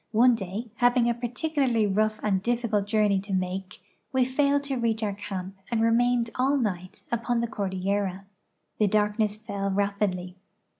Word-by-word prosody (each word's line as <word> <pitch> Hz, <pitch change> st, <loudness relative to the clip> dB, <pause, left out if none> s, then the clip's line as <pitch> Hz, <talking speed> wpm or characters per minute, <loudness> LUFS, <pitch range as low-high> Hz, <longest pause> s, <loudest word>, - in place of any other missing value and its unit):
One 245 Hz, +3 st, +6 dB
day, 215 Hz, +2 st, -5 dB
having 245 Hz, 0 st, +4 dB
a 240 Hz, -, +3 dB
particularly 245 Hz, -1 st, 0 dB
rough 215 Hz, +2 st, +1 dB
and 195 Hz, -3 st, +1 dB
difficult 230 Hz, -3 st, 0 dB
journe}' 210 Hz, -2 st, +2 dB
to 200 Hz, 0 st, -6 dB
make, 185 Hz, 0 st, -3 dB, 0.3 s
we 260 Hz, -1 st, +3 dB
failed 280 Hz, +2 st, +2 dB
to 275 Hz, -2 st, -2 dB
reach 225 Hz, -1 st, 0 dB
our 205 Hz, -2 st, 0 dB
camp 195 Hz, -1 st, -6 dB
and 235 Hz, -2 st, 0 dB
remained 235 Hz, +1 st, +2 dB
all 270 Hz, +3 st, +2 dB
night 185 Hz, -7 st, -3 dB
upon 235 Hz, 0 st, 0 dB
the 235 Hz, -, +1 dB
cordillera. 195 Hz, -1 st, -2 dB, 0.5 s
The 210 Hz, -, +4 dB
darkness 210 Hz, +1 st, +1 dB
fell 200 Hz, -2 st, -4 dB
rapidly. 195 Hz, -2 st, -1 dB
215 Hz, 155 wpm, -27 LUFS, 195-240 Hz, 0.5 s, One